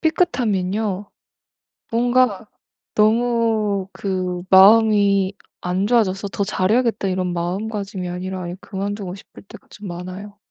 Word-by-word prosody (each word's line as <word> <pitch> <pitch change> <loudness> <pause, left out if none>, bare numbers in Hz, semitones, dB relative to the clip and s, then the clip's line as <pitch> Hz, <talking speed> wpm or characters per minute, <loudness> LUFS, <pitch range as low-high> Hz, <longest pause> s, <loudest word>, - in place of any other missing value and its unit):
삐끗하면요. 215 - 0 0.8
뭔가 240 -3 +2 0.5
너무 220 -3 +1
그 185 -2 -3
마음이 200 -1 +5 0.3
안 180 +2 -1
좋아져서 205 -4 +1
'더 200 0 -2
잘 190 -1 -1
해야겠다.' 225 -4 +1
이런 185 -1 -1
마음가짐이 195 +2 -3
아니라 185 +1 -5
아예 175 0 -5
그만두고 200 -1 -5
싶을 195 - -14
때가 - - -15
좀 210 -1 -9
많아요. 185 +4 -8
200 Hz, 275 characters per minute, -21 LUFS, 185-220 Hz, 0.8 s, 마음이